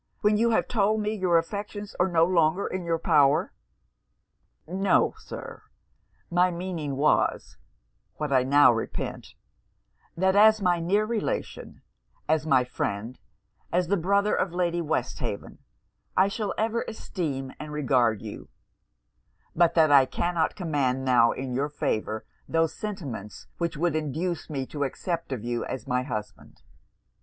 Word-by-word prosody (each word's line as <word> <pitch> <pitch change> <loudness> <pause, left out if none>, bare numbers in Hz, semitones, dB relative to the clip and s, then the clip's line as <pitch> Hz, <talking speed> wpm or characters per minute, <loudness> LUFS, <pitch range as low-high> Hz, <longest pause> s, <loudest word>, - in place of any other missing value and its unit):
when 210 0 +3
you 230 +2 +3
have 225 - +1
told 215 -1 +1
me 210 0 -1
your 185 -5 +2
affections 205 +4 -4
are 180 - +4
no 165 -2 +3
longer 170 +1 +2
in 185 -1 -3
your 165 -1 0
power!' 145 -2 +3 1.1
'No, 190 +4 +2
Sir; - - -9 0.7
my 180 +1 +4
meaning 170 -5 -4
was, 150 +2 +1 0.6
what 150 -2 -2
I 130 - +5
now 140 0 +5
repeat 115 - -5 0.8
that 190 +2 +2
as 215 +1 +6
my 180 -3 +2
near 200 +6 +1
relation, 235 - -4 0.4
as 155 0 +1
my 130 -4 +4
friend, 115 -1 -4 0.5
as 175 +1 +1
the 200 - +3
brother 200 +3 +1
of 185 - 0
Lady 175 -1 0
Westhaven, 160 - -3 0.6
I 190 +1 +5
shall 205 0 -3
ever 225 +2 0
esteem 150 -11 -4
and 150 0 -7
regard 125 -7 +1
you; - - -8 1.1
but 170 -1 +3
that 160 -3 +5
I 135 -2 +7
cannot 170 +2 -1
command 140 -7 -1
now 120 -2 +5
in 130 -1 -5
your 140 +4 -1
favour 110 -7 -2 0.2
those 165 -1 +1
sentiments 145 - -6
which 170 -1 -1
should 165 +1 0
induce 155 +3 -2
me 135 -3 -3
to 145 +2 -4
accept 165 +3 -3
of 125 -5 -4
you 120 0 -2
as 130 -4 -5
my 125 0 0
husband. 105 -6 -7
165 Hz, 145 wpm, -26 LUFS, 135-190 Hz, 1.1 s, I